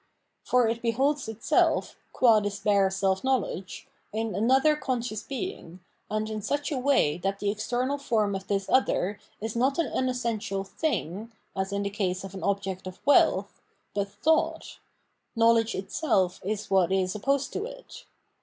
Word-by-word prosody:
For 250 -2 +3
it 230 +1 -1
beholds 270 +5 +1
itself, 220 0 +1 0.2
qua 230 -4 +5
this 205 -1 -3
bare 200 -2 +3
self 190 0 0
knowledge, 260 -6 -2 0.2
in 220 0 -2
another 265 - +4
conscious 240 -6 -3
being, 265 - -6 0.3
and 215 0 -1
in 215 -1 -4
such 285 +8 -2
a 285 - -1
w'ay 250 - +2
that 195 +1 -1
the 200 0 0
external 250 +6 -1
form 220 -7 +1
of 195 0 -5
this 195 -1 -1
other 205 -6 +1 0.2
is 220 +1 -4
not 260 +4 +2
an 335 - +2
unessential 235 -7 -2
''thing," 205 - -3 0.3
as 190 0 -2
in 200 0 -1
the 200 - -2
case 190 -2 -2
of 195 0 -8
an 190 - -7
object 195 -2 -2
of 185 - -8
wealth, 285 - +3 0.3
but 200 -1 -1
thought; 300 +11 0 0.6
knowledge 230 0 +4
itself 190 - 0
is 205 +2 -3
what 190 -2 +3
is 185 -1 +1
opposed 275 +6 0
to 415 - -2
it. - - -11
215 Hz, 160 wpm, -27 LUFS, 195-255 Hz, 0.6 s, qua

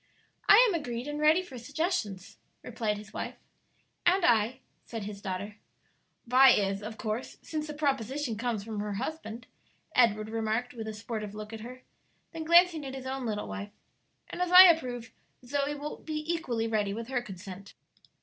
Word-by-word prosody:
"I 410 - +10
am 415 - 0
agreed 245 -6 -3
and 295 0 -4
ready 310 +4 +4
for 265 -9 -10
suggestions," 275 - -3 0.2
replied 220 -3 -2
his 210 0 -11
wife. - - -4 0.7
"And 360 +1 +4
I," 235 +2 +3 0.2
said 225 -3 -6
his 200 0 -7
daughter. 200 +1 -5 0.7
"Vi 255 +2 +7
is, 200 -4 +2
of 220 +1 -7
course, 220 +3 -4
since 310 -1 -4
the 300 - -6
proposition 270 -3 -1
comes 225 -2 -2
from 215 -1 -5
her 210 0 -3
husband," 235 0 -5 0.5
Edward 215 -3 +3
remarked, 225 +2 -1
with 225 -2 -6
a 220 - -4
sportive 210 -1 -5
look 215 +1 -7
at 225 - -6
her; 250 +3 -10 0.5
then 325 -2 -6
glancing 340 -1 +5
at 270 -1 -6
his 260 -1 -7
own 260 -1 -3
little 210 -1 -3
wife: 205 0 -6 0.6
"and - - -5
as 360 -1 0
I 365 +1 +12
approve, 250 -10 +3 0.3
Zoe 285 +3 -1
will 290 +1 -6
be 310 - -6 0.2
equally 240 -9 -2
ready 210 -3 0
with 230 0 -5
her 255 -2 0
consent." 195 -2 -10
240 Hz, 175 wpm, -29 LUFS, 215-290 Hz, 0.7 s, I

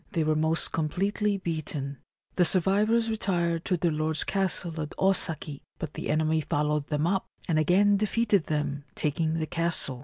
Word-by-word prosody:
They 165 -4 +1
were 155 0 +1
most 160 +1 +1
completely 200 +6 0
beaten. 155 -6 -4 0.4
The 180 - +4
survivors 205 +6 +2
retired 175 -7 -1
to 180 - +1
their 170 0 +1
lord's 155 0 0
castle 180 -4 -2
at 150 - -6
Osaki; 160 -6 0 0.2
but 155 -2 -6
the - - -5
enemy 155 +1 +2
followed 150 0 -1
them 150 0 0
up, 190 +2 0 0.2
and 160 -3 +2
again 200 +6 +4
defeated 210 -3 +1
them, 145 -2 -2
taking 155 +2 0
the 160 -1 -1
castle. 165 -6 +1
165 Hz, 160 wpm, -27 LUFS, 155-190 Hz, 0.4 s, The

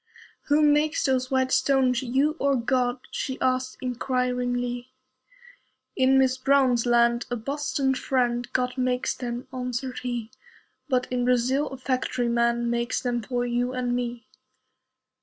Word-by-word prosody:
"Who 300 +1 +4
makes 300 +1 +3
those 255 -2 +1
white 260 -1 +1
stones, 260 -1 +2
you 270 +5 +1
or 280 0 +2
God?" 250 0 0
She 260 -1 -4
asked, 255 0 0
inquiringly. 245 -1 -1 1.1
"In 260 +1 +4
Miss 260 -1 +2
Brown's 255 -3 +3
land 235 0 +3
[a 245 - -1
Boston 265 +2 -1
friend] 245 -2 -1
God 250 0 -1
makes 250 0 0
them," 245 0 -5
answered 255 0 -4
he. 240 -3 -4 0.6
"But 255 -2 +2
in 250 -1 0
Brazil 250 +4 +2
a 265 - -7
factory 255 -2 -1
man 235 0 +1
Makes 235 0 -1
them 240 -1 -1
for 245 +2 -2
you 245 +1 -1
and 250 -1 -1
me." 240 -2 -4
250 Hz, 140 wpm, -25 LUFS, 245-260 Hz, 1.1 s, Who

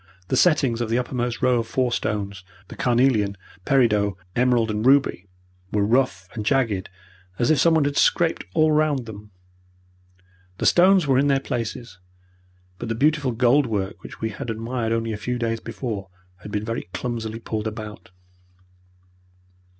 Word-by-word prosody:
The - - +1
settings 135 -6 +3
of 115 - -2
the 115 - +1
uppermost 120 -1 -2
row 125 -1 +3
of 115 - -3
four 125 -2 0
stones 100 -4 -3 0.3
the - - -9
carnelian, 120 -5 +2 0.3
peridot, 105 -7 +2 0.2
emerald, 120 -2 +2
and 105 0 -2
ruby 135 -7 +3 0.4
were 105 -1 +1
rough 110 -5 +1
and 110 - -4
jagged 110 -6 0 0.5
as 120 - +2
if 155 - +3
someone 160 -3 +4
had 145 0 -1
scraped 170 -1 +2
all 155 -1 +4
round 150 -4 +1
them. 105 -1 -10 1.3
The - - -3
stones 185 0 +5
were 135 -2 +3
in 140 - +2
their 135 -1 +3
places, 120 -5 -5 0.8
but 120 - -5
the 115 - -1
beautiful 145 +1 +2
gold 125 +4 +3
work 100 -3 -3
which - - -11
we 110 - -1
had 110 - -7
admired 115 +1 -3
only 115 0 -1
a - - -4
few 125 +4 -3
days 115 -1 -1
before 105 -6 -5 0.3
had 105 +3 -11
been 105 +1 -2
very 115 -5 -4
clumsily 115 -2 -4
pulled 110 -1 -4
about. 105 -2 -8
120 Hz, 160 wpm, -23 LUFS, 110-130 Hz, 1.3 s, stones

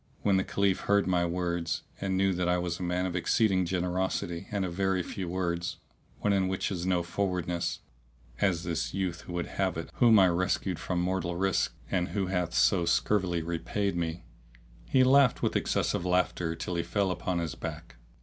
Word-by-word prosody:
When 100 -2 +3
the 95 - +2
Caliph 100 -1 +1
heard 100 0 +2
my 90 -2 +2
words 85 -1 -2 0.2
and 95 -1 -1
knew 95 0 +3
that 90 0 0
I 90 - +3
was 90 -1 -2
a - - -7
man 90 +1 0
of 90 -1 -3
exceeding 95 0 +2
generosity 90 0 -2
and 100 -2 -1
of 90 - -4
very 95 0 +1
few 90 -1 -5
words, 85 -1 -2 0.4
one 105 - +2
in 95 -1 +2
whom 95 - 0 0.2
is 90 -1 -3
no 90 -2 +2
forwardness 85 -2 -2 0.6
(as 90 -4 +1
this 85 -1 -2
youth 90 -3 -3
would 85 -1 -2
have 95 -3 -1
it 80 - -6
whom 115 -3 +6
I 95 -2 +7
rescued 90 0 0
from 90 +1 -2
mortal 90 -1 -1
risk 95 0 0 0.2
and 90 -1 +1
who 95 +2 -1
hath 90 -2 -1
so 95 -4 +4
scurvily 90 0 +1
repaid 85 +4 -2
me), 85 0 -3 0.7
he 130 - +5
laughed 135 -1 +5
with - - +1
excessive - - 0
laughter 90 -2 0
till 90 +2 -4
he 85 - 0
fell 100 +1 0
upon 90 0 -2
his 85 -5 -2
back. 60 - -7
90 Hz, 190 wpm, -29 LUFS, 85-95 Hz, 0.7 s, I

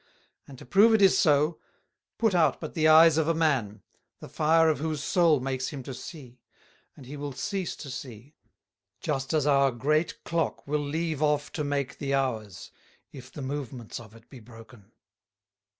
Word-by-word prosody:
And 135 - -12
to - - -13
prove 210 - +5
it 215 - +2
is 190 - +6
so, 150 +1 +2 0.6
put 225 -3 +1
out 170 -3 +2
but 155 - -7
the 155 -2 +2
Eyes 160 0 +7
of 160 - 0
a 165 - +1
Man, 135 -11 0 0.4
the - - -10
Fire 160 +1 +3
of 155 -3 +1
whose 155 -1 -3
Soul 165 -4 +3
makes 130 0 -3
him 140 -3 -7
to 135 - -7
see, 125 -3 -11 0.6
and 135 - -13
he 140 +4 -8
will 145 -1 -6
cease 190 - -4
to 140 - -9
see; 125 +2 -9 0.7
just 135 -4 -3
as 155 -3 +1
our 140 -2 +4
great 150 +7 -1
Clock 165 -3 -2
will 150 +1 -1
leave 155 +1 -3
off 150 -1 0
to 150 - -3
make 140 -2 -3
the 140 -1 -1
Hours, 110 -8 -3 0.4
if 130 -2 -12
the 145 - -8
Movements 130 -4 -6
of 110 -2 -14
it 115 +1 -18
be 130 - -13
broken. 115 -2 -16
145 Hz, 180 wpm, -27 LUFS, 130-160 Hz, 0.7 s, Eyes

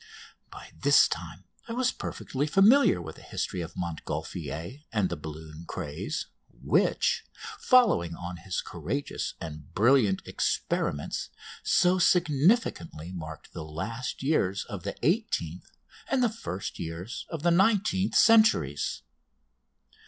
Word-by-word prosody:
By - - -11
this - - +5
time - - -6 0.2
I 230 - -4
was 250 +1 +1
perfectly 140 +3 -3
familiar 200 - +5
with 80 -2 -8
the - - -13
history 90 - -3
of 80 - -7
Montgolfier 85 - -5
and 105 -4 +1
the 85 - -2
balloon 80 +1 -9
craze, 90 - -4 0.2
which, - - +1 0.4
following 215 - +4
on 90 +1 -6
his 90 +2 -3
courageous 95 - -4
and 75 -1 -8
brilliant 110 -3 +4
experiments, 70 -1 -1 0.3
so 180 +1 +3
significantly 155 - +2
marked 80 -4 -8
the 80 - -6
last 95 +14 -5
years 100 -10 +1
of 100 -3 -7
the - - -4
eighteenth, 145 - -1 0.4
and 265 -2 +1
the 240 - +4
first 210 - -6
years 85 +7 -6
of 160 -3 -5
the 175 - +4
nineteenth, 195 +1 +2
centuries. 85 - +4
100 Hz, 125 wpm, -28 LUFS, -, 0.4 s, this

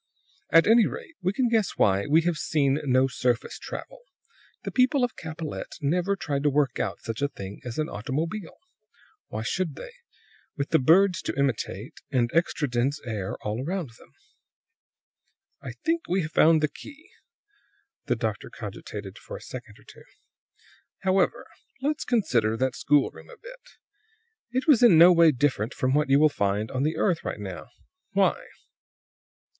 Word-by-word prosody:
"At 165 0 +6
any 225 0 +5
rate, 335 - -8
we 185 - +1
can 245 +5 +1
guess 225 -3 0
why 100 0 +2
we 155 +3 +4
have 170 -2 0
seen 140 -2 +1
no 130 0 +3
surface 125 -2 -1
travel. - - -8 0.6
The - - -4
people 260 +1 +3
of 245 - -1
Capellette 160 -1 -6
never 175 +7 0
tried 145 -7 -3
to 145 - +3
work 140 -3 +1
out - - -3
such 115 +3 -5
a 145 - +2
thing 100 -7 -9
as 120 -2 -6
an 155 0 0
automobile; 160 - -4 0.7
why 110 - -5
should 165 +3 -2
they, - - -9 0.7
with 140 0 -2
the - - +5
birds 180 +7 +4
to - - -4
imitate, 125 -5 -2
and 120 -4 +1
extra 165 -2 +1
dense 130 +4 0
air 105 -5 -4
all 105 +3 -2
about 160 -5 -4
them? - - -21 1.5
"I - - -7
think 330 0 0
we 185 +1 +1
have 155 - -6
found 160 0 +5
the - - +4
key." 295 - -14 0.9
The - - +1
doctor - - -3
cogitated - - -8
for - - -8
a - - -14
second - - -9
or - - -20
two. - - -16 1.0
"However, 190 -1 +1 0.4
let's 300 +1 -1
consider 120 - +1
that 130 0 0
schoolroom 145 -2 +1
a 480 - -13
bit. - - -13 0.8
It 255 +2 -1
was 280 -7 +5
in 235 -9 +7
no 175 +2 +9
way 165 -2 +6
different 130 -4 -1
from 130 +1 0
what 150 0 +2
you 135 - +5
will 155 - +6
find 105 -5 -1
on 130 - -2
the 155 +3 0
earth 180 -5 +1
right - - -4
now. 95 -4 -7 0.5
Why?" - - +1
150 Hz, 165 wpm, -26 LUFS, 130-190 Hz, 1.5 s, no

